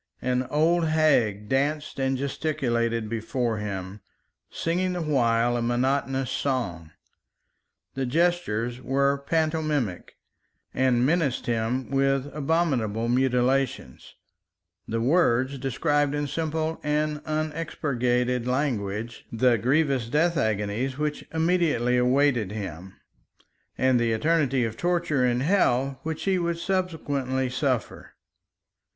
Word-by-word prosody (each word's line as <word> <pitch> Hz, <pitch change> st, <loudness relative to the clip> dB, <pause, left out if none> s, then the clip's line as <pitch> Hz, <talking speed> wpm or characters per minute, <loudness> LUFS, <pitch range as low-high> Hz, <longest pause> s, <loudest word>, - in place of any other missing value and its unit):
An 125 Hz, 0 st, 0 dB
old 165 Hz, +3 st, +2 dB
hag 140 Hz, -10 st, +2 dB
danced 145 Hz, +4 st, -1 dB
and 135 Hz, 0 st, 0 dB
gesticulated 120 Hz, -5 st, -1 dB
before 115 Hz, +1 st, -2 dB
him, 100 Hz, -1 st, -5 dB, 0.5 s
singing 180 Hz, +2 st, -1 dB
the 180 Hz, -, -3 dB
while 120 Hz, -5 st, +2 dB
a 120 Hz, -, -1 dB
monotonous 130 Hz, +2 st, 0 dB
song. 90 Hz, -, -2 dB, 1.0 s
The 135 Hz, -1 st, -2 dB
gestures 125 Hz, -7 st, 0 dB
were 140 Hz, +2 st, +1 dB
pantomimic 155 Hz, -, -1 dB, 0.6 s
and 125 Hz, -2 st, +2 dB
menaced 150 Hz, -3 st, +1 dB
him 120 Hz, +3 st, -1 dB
with 135 Hz, 0 st, +1 dB
abominable 135 Hz, -8 st, 0 dB
mutilations; 125 Hz, -, 0 dB, 0.7 s
the 115 Hz, -, -2 dB
words 130 Hz, -2 st, +2 dB
described 145 Hz, +3 st, 0 dB
in 145 Hz, 0 st, -1 dB
simple 160 Hz, +1 st, -2 dB
and 150 Hz, 0 st, -1 dB
unexpurgated 125 Hz, -6 st, -1 dB
language 115 Hz, -5 st, -2 dB
the 120 Hz, +1 st, +3 dB
grievous 135 Hz, -1 st, +1 dB
death 165 Hz, +5 st, +2 dB
agonies 110 Hz, +2 st, -1 dB
which 150 Hz, 0 st, -2 dB
immediately 160 Hz, -7 st, +1 dB
awaited 125 Hz, -4 st, +2 dB
him, 95 Hz, -3 st, -7 dB, 0.8 s
and 130 Hz, -1 st, +3 dB
the 115 Hz, -1 st, +1 dB
eternity 135 Hz, -1 st, +1 dB
of 115 Hz, 0 st, -5 dB
torture 170 Hz, -6 st, +1 dB
in 125 Hz, 0 st, +1 dB
hell 135 Hz, -6 st, +2 dB
which 160 Hz, +1 st, -4 dB
he 190 Hz, -2 st, +1 dB
would 170 Hz, -1 st, -1 dB
subsequently 145 Hz, -8 st, -1 dB
suffer. 125 Hz, -2 st, -2 dB
135 Hz, 110 wpm, -26 LUFS, 120-155 Hz, 1.0 s, the